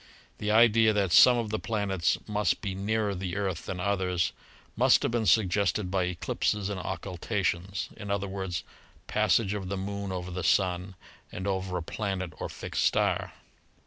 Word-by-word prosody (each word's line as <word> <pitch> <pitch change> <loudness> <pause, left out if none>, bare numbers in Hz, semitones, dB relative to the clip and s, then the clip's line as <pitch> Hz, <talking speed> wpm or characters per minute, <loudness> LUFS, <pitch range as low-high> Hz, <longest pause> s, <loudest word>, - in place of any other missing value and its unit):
The 105 - -2
idea 110 0 +5
that 100 -4 +1
some 125 +7 +8
of 115 -3 -2
the 110 - -1
planets 100 -6 0
must 105 -1 0
be 100 -4 -3
nearer 105 +2 -1
the 90 -1 -4
Earth 95 -5 -3
than 90 - -4
others 90 -3 0 0.4
must - - +4
have - - 0
been 115 -2 0
suggested 100 0 +2
by 95 -2 +1
eclipses 95 +3 -1
and 100 -2 -3
occultations 95 0 -2
— - - -20
i.e., 100 -2 -3 0.5
passage 105 -4 +2
of 95 -3 -4
the 100 - -2
Moon 100 0 -4
over 90 -1 -4
the 90 0 -4
Sun 90 +2 +1 0.4
and 95 - -6
over 95 -2 -1
a 85 - -4
planet 95 -1 -3
or - - -4
fixed - - -3
star. - - +1
95 Hz, 165 wpm, -28 LUFS, 90-105 Hz, 0.5 s, some